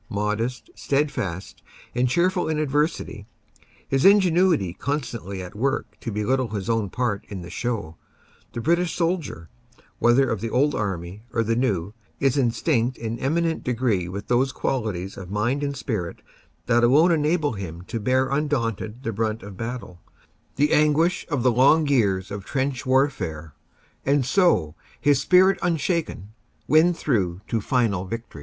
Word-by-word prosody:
Modest, 110 - -2
steadfast 135 - -2 0.3
and 125 +1 +1
cheerful 180 +4 +1
in 155 - 0
adversity, 145 - -1 0.6
his 135 0 +1
ingenuity 180 - +4
constantly 115 - -4
at 90 - -9
work 135 +6 -2
to 115 - -5
belittle 120 +5 0
his 100 -1 -3
own 110 -3 0
part 115 -4 -2
in 95 -4 -6
the 85 - -9
show, 100 -8 -3 0.6
the 120 - -4
British 170 +4 +1
soldier, 165 - -2 0.5
whether 120 +3 +4
of 110 -4 -2
the 115 - -2
old 140 +5 +2
army 95 -2 -4
or 115 - +1
the 115 +1 0
new, 105 -7 -1 0.3
is 135 -2 +2
instinct 125 -1 +1
in 115 0 -4
eminent 165 +4 0
degree 115 -8 0
with 100 +3 -6
those 125 +2 +2
qualities 105 -9 -3
of 95 -2 -8
mind 115 +8 0
and 140 -1 -2
spirit 105 -11 -4 0.4
that 120 +1 +3
alone 150 +9 +5
enabled 150 - +1
him 85 -2 -7
to 115 +4 -5
hear 130 +3 +2
undaunted 125 -5 -2
the 115 - -2
brunt 110 +1 -2
of 100 -1 -9
battle, 115 -5 -6 0.5
the 150 +2 +2
anguish 155 +3 +2
of 145 -6 -1
the 125 - +4
long 140 +6 +4
years 100 -9 +1
of 100 -1 -5
trench 130 +2 -2
warfare, 95 - 0 0.5
and 140 -1 +2
so, 125 - +2 0.3
his 145 -2 +3
spirit 185 +4 +5
unshaken, 165 - -1 0.4
win 160 +3 +5
through 100 - -1
to 115 - -1
final 105 -6 0
victory. 115 -5 -7
120 Hz, 150 wpm, -24 LUFS, 100-145 Hz, 0.6 s, alone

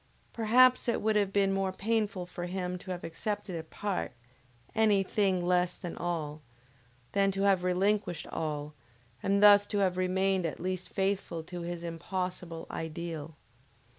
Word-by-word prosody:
Perhaps 250 +3 +5
it 235 - +1
would 215 0 +1
have 200 -2 +2
been 195 -1 +2
more 195 -1 0
painful 205 -2 -1
for 175 0 -6
him 180 0 -3
to 185 - -12
have 180 -1 -4
accepted 205 +3 -4
a 165 - -3
part, 195 -1 -3 0.6
any 210 -3 +4
thing 190 -2 +1
less 180 0 +2
than 175 - -6
all, 155 -3 -3 0.7
than 200 0 +3
to 195 0 -1
have 195 -3 +4
relinquished 185 -1 +1
all, 150 -2 -3 0.5
and 200 +1 +2
thus 205 0 +8
to 205 - -2
have 185 -2 +2
remained 190 +1 +1
at 155 - -6
least 185 +1 -3
faithful 190 -4 -1
to 175 +1 -7
his 170 0 -5
impossible 170 0 -4
Ideal! 160 -1 -5
185 Hz, 155 wpm, -30 LUFS, 175-200 Hz, 0.7 s, thus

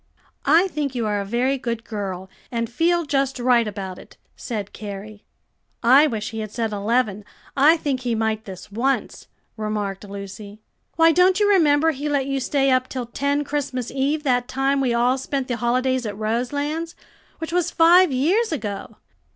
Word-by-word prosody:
"I 330 +6 +5
think 290 -5 -3
you 235 -2 -1
are 205 -1 0
a - - -5
very 250 +6 0
good 235 -2 -3
girl, 195 -4 -5 0.2
and 230 -1 -1
feel 340 +5 +1
just 275 -2 0
right 240 -2 +3
about 190 -3 -6
it," - - -16 0.2
said 210 -5 -5
Carrie. 205 0 -8 0.6
"I 265 +6 +7
wish 215 -5 -4
he 225 - -5
had 215 -1 -4
said 225 -2 -2
eleven, 210 0 0 0.3
I 295 +4 +6
think 280 -4 -2
he 245 -2 -1
might 220 0 -1
this 190 0 -10
once," 260 +6 -1 0.3
remarked 210 -2 -3
Lucy. 200 +1 -9 0.3
"Why, 330 0 +6
don't 365 +4 +4
you 415 - +3
remember 320 -5 +4
he 295 0 -4
let 280 -2 +1
you 275 0 -1
stay 270 +1 +1
up 255 0 +2
till 255 -2 -4
ten 280 +4 -1
Christmas 275 -4 -3
Eve 280 +3 0
that 250 -3 +1
time 270 +1 0
we 255 -3 +1
all 245 +3 +2
spent 270 0 -3
the 245 - -2
holidays 255 +1 0
at 205 -1 -6
Roselands, 285 +9 -2 0.4
which 325 +1 -6
was 355 -1 +1
five 350 0 +5
years 345 - +1
ago?" 210 -9 -5
255 Hz, 175 wpm, -22 LUFS, 215-290 Hz, 0.6 s, I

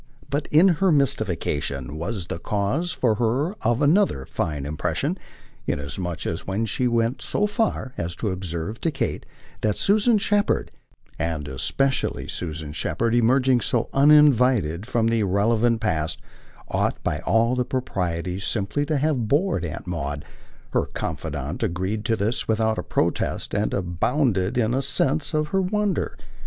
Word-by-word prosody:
But 145 +1 -2
her 180 +3 +5
mystification 75 - 0
was 85 +4 -4
the 85 - -5
cause 105 - -1
for 120 -4 +1
her 130 - +1
of 120 +5 +1
another 150 - +3
fine 75 -3 -3
impression, 75 +1 -1 0.5
inasmuch 80 +4 -3
as 80 - -3
when 100 +4 -1
she 125 +4 0
went 115 +1 0
so 205 - +2
far 210 - -1
as 85 0 -3
to 105 - -2
observe 90 +3 -4
to 165 - +1
Kate 150 - -3 0.3
that 105 -2 0
Susan 215 +3 +4
Shepherd 205 0 +1 0.5
and 80 -3 -2
especially 135 - -1
Susan 80 -3 -4
Shepherd 115 +8 -1
emerging 125 +1 +3
so 120 - +1
uninvited 125 - +4
from 120 -2 +1
an 115 - +2
irrelevant 110 +2 +2
past 80 -6 -1 0.5
ought - - 0
by - - -1
all 115 +5 +2
the 125 - +1
proprieties 90 - -3
simply 110 +9 -1
to 155 -1 +1
have 140 -5 0
bored 145 - +1
Aunt 80 0 -5
Maud, 75 -5 -4 0.5
her - - +1
confidant 75 -1 -4
agreed 100 +1 -2
to 115 - +2
this 110 +3 -1
without 110 0 +1
a - - -3
protest - - -1
and 105 +1 0
abounded 95 - 0
in 115 -2 +2
the 130 +2 +1
sense 145 +3 0
of 155 0 0
her 190 +3 +1
wonder. 205 -1 -1
115 Hz, 145 wpm, -24 LUFS, 85-140 Hz, 0.5 s, her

